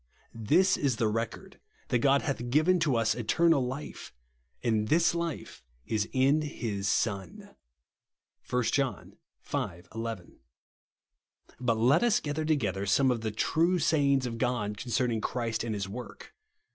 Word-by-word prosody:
" - - -37 0.2
This 190 0 +4
is 135 -4 0
the 115 -1 +1
record, 115 +1 -4 0.3
that 125 - +2
God 140 +3 +3
hath 125 -5 -3
given 155 +7 +3
to 150 -6 +1
us 115 -1 +2
eternal 140 +6 +2
life; 130 +4 -6 0.5
and 110 -3 +1
this 165 +4 +3
life 170 -1 -5 0.2
is 110 -1 -1
in 135 +4 +3
his 110 -9 -3
Son," 100 -4 -2 0.9
(1 125 0 +1
John 135 +3 -2 0.3
v. 85 -1 -3
11). 115 -5 -6 1.2
Bat 120 -3 +1
let 130 +9 +4
us 240 -3 +3
cfather 150 +1 -3
toq 150 -5 +1
ether 100 +1 -3
some 130 +7 +3
of 120 -2 -2
the 110 -1 -2
^'true 170 - +1
sayings 140 -4 +2
of 115 -2 -5
God" 120 -5 -1
concerning 120 +1 -1
Christ 115 -2 -2
and 115 -2 -3
his 100 -1 -3
work. 120 +5 -9
125 Hz, 150 wpm, -29 LUFS, 110-145 Hz, 1.2 s, This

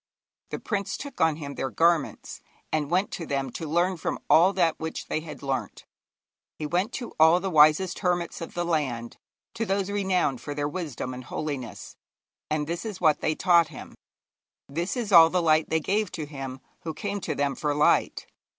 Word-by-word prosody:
The - - -3
prince 200 -3 -3
took 285 0 -7
on 160 -1 +4
him 145 -2 -7
their 135 - -3
garments, 165 0 0 0.3
and 150 -2 0
went 185 +4 +1
to 165 - -5
them 135 -2 -2
to 160 +3 -6
learn 175 +3 +1
from - - -2
all 175 +4 +7
that 170 -4 +1
which 160 0 -5
they - - 0
had 155 -2 -9
learnt. 130 -7 -3 0.7
He 155 - -4
went 180 +8 0
to 245 - -5
all 160 +3 +6
the 190 +1 -3
wisest 155 +4 +5
hermits 175 -3 -1
of 165 - -7
the 175 0 -1
land, 130 -8 -2 0.4
to 225 - -2
those 195 -1 -1
renowned 185 -10 0
for 145 +4 -6
their 145 0 -1
wisdom 145 -6 -4
and 125 0 -8
holiness; 135 -4 -5 0.5
and 150 -1 0
this 170 +2 -4
is 215 -4 -6
what 155 -4 +3
they 155 - +1
taught 170 -2 +4
him, 155 - -10 0.7
this 170 - -3
is 225 -4 -3
all 165 -3 +9
the 180 - +1
light 160 -2 +3
they 160 - +2
gave 200 +5 0
to 155 - -4
him 135 -3 -7 0.2
who 160 -2 -6
came 205 +1 -3
to 155 - -3
them 140 0 0
for 150 -1 -1
light. 150 - +2
160 Hz, 195 wpm, -26 LUFS, 145-180 Hz, 0.7 s, all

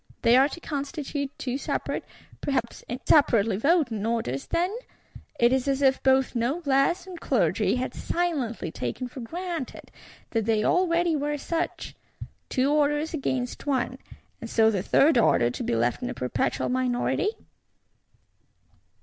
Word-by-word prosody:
They 235 - +6
are 270 +3 +5
to 345 - -8
constitute 285 -2 -4
two 260 +1 -3
separate, - - -3 0.4
perhaps 260 -4 -2 0.2
separately 230 -9 +4
voting 245 - +1
Orders, 220 - -2
then? 360 +5 0 0.6
It 240 +1 +5
is 265 0 0
as 275 0 +1
if 265 -1 +3
both 265 0 +3
Noblesse 275 +7 +1
and 365 -3 -9
Clergy - - +1
had 255 0 -3
silently 270 - -2
taken 125 - -4
for 250 - -10
granted 335 +2 -6 0.4
that 225 -3 0
they 220 -1 +2
already 345 +1 +2
were 295 0 -1
such! 335 +4 -3 0.6
Two 265 +2 +1
Orders 295 +1 +1
against 260 -3 -3
one; 260 -1 0 0.4
and 230 - -6
so 220 0 +4
the 195 -4 -1
Third 275 - +4
Order 120 - +3
to - - -6
be - - 0
left 120 +1 0
in - - -3
a - - -5
perpetual 125 -1 -1
minority? 255 +9 0
265 Hz, 140 wpm, -26 LUFS, 235-305 Hz, 0.6 s, They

